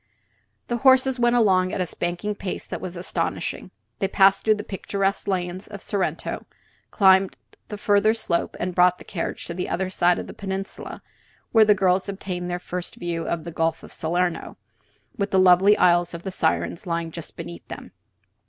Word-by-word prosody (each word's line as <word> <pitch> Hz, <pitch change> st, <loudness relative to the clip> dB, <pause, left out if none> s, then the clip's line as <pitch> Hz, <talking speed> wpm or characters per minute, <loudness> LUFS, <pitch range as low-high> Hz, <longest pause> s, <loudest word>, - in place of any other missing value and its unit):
The 240 Hz, -, -1 dB
horses 260 Hz, 0 st, +4 dB
went 240 Hz, 0 st, +3 dB
along 185 Hz, -5 st, +3 dB
at -, -, -3 dB
a 180 Hz, -, +1 dB
spanking 175 Hz, +5 st, -3 dB
pace 195 Hz, -2 st, -5 dB
that -, -, -6 dB
was 180 Hz, -1 st, -6 dB
astonishing. 175 Hz, +2 st, -3 dB, 0.3 s
They 195 Hz, -, +1 dB
passed 195 Hz, 0 st, +4 dB
through 215 Hz, -1 st, +4 dB
the 210 Hz, -, -6 dB
picturesque 195 Hz, 0 st, -2 dB
lanes 185 Hz, -1 st, -2 dB
of 205 Hz, -1 st, -8 dB
Sorrento, 195 Hz, -1 st, -3 dB, 0.4 s
climbed 190 Hz, -2 st, +4 dB, 0.3 s
the 210 Hz, -, -6 dB
further 205 Hz, +1 st, +3 dB
slope, 170 Hz, -6 st, -2 dB
and 180 Hz, +1 st, -2 dB
brought 180 Hz, 0 st, +4 dB
the -, -, -12 dB
carriage 170 Hz, -4 st, -5 dB
to 170 Hz, -, -5 dB
the 180 Hz, +1 st, -4 dB
other 185 Hz, +2 st, -2 dB
side 175 Hz, -1 st, +3 dB
of -, -, -4 dB
the -, -, -9 dB
peninsula, 195 Hz, 0 st, -6 dB, 0.5 s
where 220 Hz, -2 st, +6 dB
the 210 Hz, -1 st, +5 dB
girls 190 Hz, 0 st, +1 dB
obtained 180 Hz, -2 st, -4 dB
their 175 Hz, -, -1 dB
first 180 Hz, 0 st, -6 dB
view 170 Hz, -1 st, -4 dB
of 170 Hz, -2 st, -2 dB
the 170 Hz, -, -7 dB
Gulf 165 Hz, 0 st, -1 dB
of -, -, -10 dB
Salerno, 175 Hz, +2 st, -2 dB, 0.6 s
with 200 Hz, 0 st, -1 dB
the 190 Hz, -, +1 dB
lovely 185 Hz, +2 st, +6 dB
Isles 175 Hz, -1 st, +3 dB
of 170 Hz, -, -8 dB
the 190 Hz, -, -4 dB
Sirens 165 Hz, +1 st, -1 dB
lying 170 Hz, -1 st, -2 dB
just 170 Hz, 0 st, -8 dB
beneath 85 Hz, 0 st, -8 dB
them. -, -, -9 dB
185 Hz, 185 wpm, -24 LUFS, 175-200 Hz, 0.6 s, where